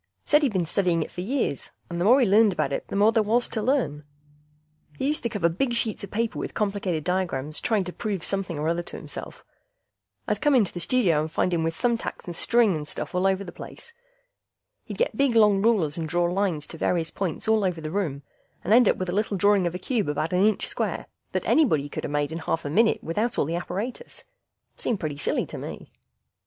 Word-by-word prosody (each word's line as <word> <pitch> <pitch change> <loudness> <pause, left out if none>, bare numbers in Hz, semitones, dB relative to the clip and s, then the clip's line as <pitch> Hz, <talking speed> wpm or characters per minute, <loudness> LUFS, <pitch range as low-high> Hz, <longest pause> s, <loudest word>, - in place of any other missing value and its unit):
Said 295 +1 +4
he'd 280 -5 +2
been 180 -3 +1
studying 170 -1 +1
it - - -10
for 180 - -5
years, 220 - -2 0.2
and 170 0 -4
the - - +1
more 250 +6 +6
he 255 - +4
learned 210 0 +5
about 140 -5 -1
it - - -3
the - - -5
more 205 +2 +5
there 225 - +3
was 230 +3 +2
to 220 - -2
learn. 220 - 0 0.9
He - - -2
used 300 +2 +1
to 235 - -1
cover 205 -7 +1
big 235 +9 -1
sheets 225 -3 +1
of 200 - -6
paper 230 +1 -2
with - - -5
complicated 195 -6 -1
diagrams 165 -5 -1
trying 220 -4 +1
to 180 0 -7
prove 200 -5 -3
something 195 -5 -2
or 150 +2 -1
other 170 +1 0
to - - -8
himself. - - -9 0.8
I'd - - -1
come 295 -2 +4
into 215 -8 +3
the 175 - -5
studio 175 -7 +2
and 155 +1 -4
find 180 - 0
him 165 -1 +1
with 165 0 -1
thumb 235 +3 +1
tacks - - -6
and 175 - -6
strings 230 -1 +3
and 150 -1 -5
stuff - - -5
all 180 +1 +2
over 190 0 +1
the 175 - -8
place. 465 - -9 0.9
He'd - - -7
get - - 0
big 275 -4 +2
long 210 -3 +5
rulers 190 -9 +2
and 160 -1 -3
draw 175 +2 +1
lines 175 -4 0
to 165 - -9
various 165 -2 0
points 190 +1 -3
all 220 -1 +3
over 180 -3 -1
the 155 -1 -5
room, 160 -8 -2 0.4
and - - +2
end 240 -2 +6
up - - +2
with 185 - -3
a 175 - -2
little 205 0 0
drawing 200 -1 +3
of 170 - -4
a - - -1
cube 210 - -1
about 155 +3 -1
an 180 +2 +3
inch 215 0 +2
square - - -2 0.3
that - - -1
anybody 155 - +3
coulda - - -5
made 145 0 -1
in 165 - -4
a 160 - -11
half 165 - -1
a 145 - -3
minute 225 +7 +3
without 215 +9 -1
all - - +2
the 165 +3 -2
apparatus. 205 - -4 0.5
Seemed 225 -5 -2
pretty 150 -3 -3
silly - - 0
to - - -8
me. - - -8
190 Hz, 240 wpm, -25 LUFS, 165-220 Hz, 0.9 s, more